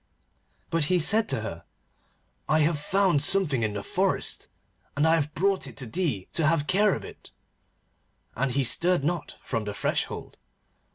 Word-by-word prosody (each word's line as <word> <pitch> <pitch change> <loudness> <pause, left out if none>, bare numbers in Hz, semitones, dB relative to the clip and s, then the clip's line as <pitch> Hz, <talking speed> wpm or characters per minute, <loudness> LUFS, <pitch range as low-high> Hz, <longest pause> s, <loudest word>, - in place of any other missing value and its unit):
But 165 -3 +1
he 180 +4 +2
said 215 +7 +3
to - - +1
her, 85 -6 -6 0.9
'I 155 0 +3
have 155 0 +1
found 185 -1 +2
something 150 -5 +2
in 110 -2 -1
the 100 - -4
forest, - - -1 0.5
and 150 +3 +3
I 160 - +4
have 155 -2 0
brought 195 +3 +1
it - - -12
to 135 - -4
thee 125 - -2
to 160 -3 +2
have 155 -2 +2
care 205 +4 +3
of - - -7
it,' - - -13 1.1
and 135 +4 0
he 135 +2 +1
stirred 170 +6 +3
not 170 0 -2
from 115 -2 -3
the 105 -1 -5
threshold. - - -3
155 Hz, 170 wpm, -26 LUFS, 135-180 Hz, 1.1 s, I